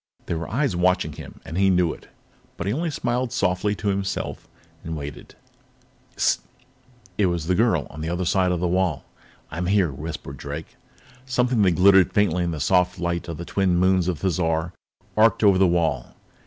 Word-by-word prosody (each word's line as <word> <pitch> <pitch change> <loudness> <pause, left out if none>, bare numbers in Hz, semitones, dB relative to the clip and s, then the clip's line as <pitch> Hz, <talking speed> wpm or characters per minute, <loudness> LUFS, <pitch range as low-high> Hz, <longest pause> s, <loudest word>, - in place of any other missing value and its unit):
There 85 - -2
were 80 - -6
eyes 130 -3 0
watching 90 +1 +1
him, - - -11
and 80 +3 -4
he 95 0 +4
knew 90 -3 +2
it, - - -15 0.5
but - - -4
he 100 - 0
only 165 +5 -1
smiled 125 -3 -2
softly 100 -1 0
to 100 +1 -2
himself 95 0 -3 0.4
and 80 -1 -4
waited. 70 -1 -8 0.8
"Sssssst!" - - +2 0.8
It 100 - +4
was 85 -3 -2
the 90 - +1
girl, 95 -6 +2
on 75 - -8
the 80 - -3
other 90 +1 -2
side 90 +1 +2
of 90 - -1
the 90 - 0
wall. 90 -4 0 0.5
"I'm 85 +3 -3
here," 95 -4 +2
whispered 70 -1 -7
Drake. 70 +4 -7 0.5
Something 125 -2 +1
that 95 -3 +4
glittered 95 +1 +5
faintly 90 -4 +2
in 85 - -1
the 80 -2 -4
soft 90 +4 +2
light 85 -1 -2
of 85 -2 -5
the 85 - -6
twin 95 0 +1
moons 95 0 +3
of 90 -3 -1
Thizar 85 -1 -1 0.4
arced 115 +1 +4
over 100 -3 +5
the 95 - +5
wall. 80 -8 0
90 Hz, 190 wpm, -23 LUFS, 85-100 Hz, 0.8 s, glittered